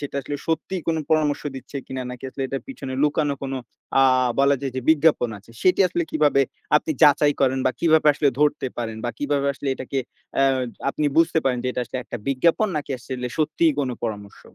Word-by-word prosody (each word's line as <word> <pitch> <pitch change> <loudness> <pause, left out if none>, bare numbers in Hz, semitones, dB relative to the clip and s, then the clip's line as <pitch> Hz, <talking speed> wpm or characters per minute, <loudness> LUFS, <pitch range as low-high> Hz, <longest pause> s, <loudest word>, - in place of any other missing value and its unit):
সেটা 145 -1 -5
আসলে 145 +2 -5
সত্যিই 170 +3 -2
কোনো 160 -1 +1
পরামর্শ 155 -2 +2
দিচ্ছে 135 +2 -8
কিনা 130 -1 -5
নাকি 125 +1 -9
আসলে 135 - -5
এটার 135 +1 -4
পিছনে 140 - -6
লুকানো 150 -1 +1
কোনো 135 0 -3 0.4
অ্যা 135 - +5 0.4
বলা 140 0 +4
যায় 135 -2 -3
যে - - -1
বিজ্ঞাপন 155 -5 +3
আছে। 100 - -19
সেটি 185 +1 +4
আসলে 175 -1 -1
কিভাবে 150 -3 +3 0.4
আপনি 150 - -1
যাচাই 145 0 +6
করেন 135 -1 +2
বা - - +4
কিভাবে 160 -2 +4
আসলে 145 0 +2
ধরতে 150 -2 +2
পারেন 115 -2 -3
বা 120 - 0
কিভাবে 145 -1 0
আসলে 140 - -5
এটাকে 130 +1 -4 0.4
অ্যা 135 - +4 0.4
আপনি 150 - -2
বুঝতে 165 0 +4
পারেন 130 -2 +1
যে 125 - -1
এটা - - -2
আসলে 130 - -5
একটা - - -6
বিজ্ঞাপন 165 +10 +2
নাকি 145 -1 -4
আসলে 125 +1 -5
সত্যিই 155 +1 +2
কোনো 130 -3 -1
পরামর্শ? 105 -3 -6
140 Hz, 200 wpm, -23 LUFS, 130-155 Hz, 0.4 s, যাচাই